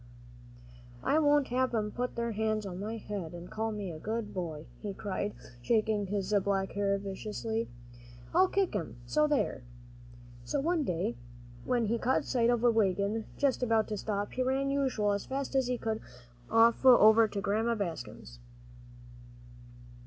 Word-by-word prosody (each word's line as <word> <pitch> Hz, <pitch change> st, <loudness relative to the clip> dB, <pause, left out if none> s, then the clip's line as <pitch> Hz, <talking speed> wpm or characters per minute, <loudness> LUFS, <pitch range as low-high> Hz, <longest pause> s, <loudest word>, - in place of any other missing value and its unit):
"I 310 Hz, -, +3 dB
won't 290 Hz, -2 st, +3 dB
have 255 Hz, 0 st, +1 dB
'em 210 Hz, -1 st, -1 dB
put 245 Hz, +3 st, -3 dB
their 235 Hz, 0 st, -1 dB
hands 215 Hz, 0 st, -1 dB
on 185 Hz, -2 st, -6 dB
my 220 Hz, +3 st, -4 dB
head 195 Hz, -6 st, -6 dB
and 175 Hz, +1 st, -9 dB
call 220 Hz, +1 st, -2 dB
me 200 Hz, -6 st, -5 dB
good 220 Hz, +3 st, -3 dB
boy," 160 Hz, -5 st, -4 dB
he 200 Hz, -2 st, -5 dB
cried, 205 Hz, 0 st, -3 dB, 0.3 s
shaking 215 Hz, -, +1 dB
his 200 Hz, +1 st, -2 dB
black 195 Hz, -1 st, 0 dB
hair 200 Hz, -1 st, +1 dB
viciously. 215 Hz, +3 st, -4 dB, 0.6 s
"I'll 375 Hz, -, +5 dB
kick 390 Hz, -, 0 dB
'em 170 Hz, -6 st, -3 dB
so 300 Hz, -, +2 dB
there!" 290 Hz, -, 0 dB, 0.8 s
So 290 Hz, -, -1 dB
one 325 Hz, +2 st, +1 dB
day, 165 Hz, -, -2 dB, 0.5 s
when 240 Hz, -2 st, +1 dB
he 230 Hz, +2 st, 0 dB
caught 255 Hz, +3 st, +1 dB
sight 235 Hz, -2 st, +2 dB
of 240 Hz, -1 st, +1 dB
a 240 Hz, -, +6 dB
wagon 205 Hz, 0 st, +1 dB
just 275 Hz, -3 st, +1 dB
about 225 Hz, -3 st, +2 dB
to 215 Hz, -, -2 dB
stop, 205 Hz, 0 st, -2 dB
he 255 Hz, -, -2 dB
ran, 265 Hz, +2 st, +1 dB
as -, -, 0 dB
usual, 255 Hz, -7 st, +1 dB
as 200 Hz, 0 st, -2 dB
fast 270 Hz, +1 st, -3 dB
as 265 Hz, -2 st, +2 dB
he 250 Hz, 0 st, 0 dB
could, 220 Hz, -1 st, -3 dB, 0.5 s
off 230 Hz, +2 st, +4 dB
over 230 Hz, -3 st, +7 dB
to 205 Hz, -1 st, -4 dB
Grandma 215 Hz, +4 st, +1 dB
Bascom's. 120 Hz, -, -6 dB
220 Hz, 165 wpm, -31 LUFS, 200-245 Hz, 0.8 s, over